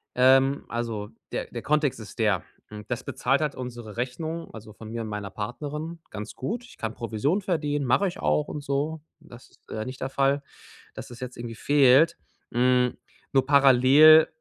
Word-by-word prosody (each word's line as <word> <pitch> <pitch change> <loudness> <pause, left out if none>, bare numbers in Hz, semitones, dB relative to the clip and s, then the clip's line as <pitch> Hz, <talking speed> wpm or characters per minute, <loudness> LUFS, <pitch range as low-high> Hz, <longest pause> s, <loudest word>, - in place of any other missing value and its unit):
Ähm, 135 +2 +4
also 115 -3 -4 0.2
der - - -3
der - - -7
Kontext 150 -2 +1
ist 110 - -12
der. 105 -5 +2 0.2
Hm, 105 0 -9
das 120 - -3
bezahlt 135 +3 0
halt 150 -2 -1
unsere 120 -4 -7
Rechnung, 155 +7 -4
also 110 -1 -11
von 110 +1 -11
mir 115 +1 -4
und - - -6
meiner 105 -2 -5
Partnerin, 150 - -6
ganz 105 0 -7
gut. 225 - -4
Ich 255 - -16
kann 110 0 -4
Provision 120 - -1
verdienen, 150 -6 -1
mache 160 +11 +3
ich - - -10
auch 75 0 +1
und 150 - -5
so. 145 +3 -2 0.2
Das 125 -6 -15
ist, - - -29
äh, 110 0 -4
nicht 130 0 -8
der 135 - -2
Fall, 135 +1 +1 0.5
dass - - -8
das 120 -1 -12
jetzt 125 -1 -7
irgendwie 120 -1 -6
fehlt. 140 +4 +4 0.3
Hm, 125 0 +2 0.3
nur 135 -1 +3
parallel 140 +3 +7
130 Hz, 185 wpm, -26 LUFS, 115-145 Hz, 0.5 s, parallel